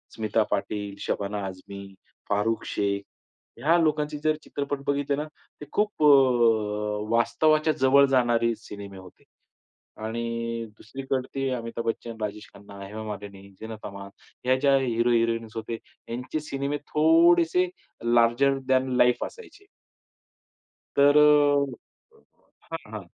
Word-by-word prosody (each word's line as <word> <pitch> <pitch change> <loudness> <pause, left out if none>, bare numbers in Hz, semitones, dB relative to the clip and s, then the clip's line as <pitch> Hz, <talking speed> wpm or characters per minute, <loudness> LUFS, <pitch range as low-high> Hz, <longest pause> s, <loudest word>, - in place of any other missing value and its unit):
स्मिता 110 0 +1
पाटील, 105 -1 -2
शबाना 100 +1 -3
आझमी, 100 +1 -8 0.4
फारुख 105 +2 0
शेख 100 -1 -1 0.6
ह्या 160 +7 +3
लोकांचे 150 -2 0
जर 155 0 +2
चित्रपट 145 0 -4
बघितले 140 0 0
ना, 150 - -2 0.4
ते - - -6
खूप 210 -6 0
अ, 110 -7 +3
वास्तवाच्या 155 +6 +3
जवळ 135 +2 +6
जाणारे 120 -2 +2
सिनेमे 100 -1 -9
होते. 95 -1 -15 0.8
आणि 115 0 -3
दुसरीकडे 135 +2 -4
ते 135 -1 -1
अमिताभ 115 -1 -5
बच्चन, 115 0 -3
राजेश 105 0 -5
खन्ना, 100 0 -13
हेमा 110 +2 -7
मालिनी, 100 -2 -8
झीनत 110 -1 -8
अमान 100 0 -8 0.4
ह्या 130 +1 +4
ज्या 140 0 +4
हीरो 120 -2 +1
हिरोइन्स 115 -1 0
होते, 115 +1 -4 0.3
यांचे 125 +6 -4
सिनेमे 140 +1 -2
थोडेसे 170 +3 +4 0.5
लार्जर 120 +4 +4
दॅन 130 0 +2
लाईफ 125 0 +4
असायचे. 450 -3 -13 1.3
तर 145 +1 +6
अ, 145 -3 +2 0.5
हां, 165 -10 -7
हां. 105 -2 -5
120 Hz, 120 wpm, -26 LUFS, 105-140 Hz, 1.3 s, जवळ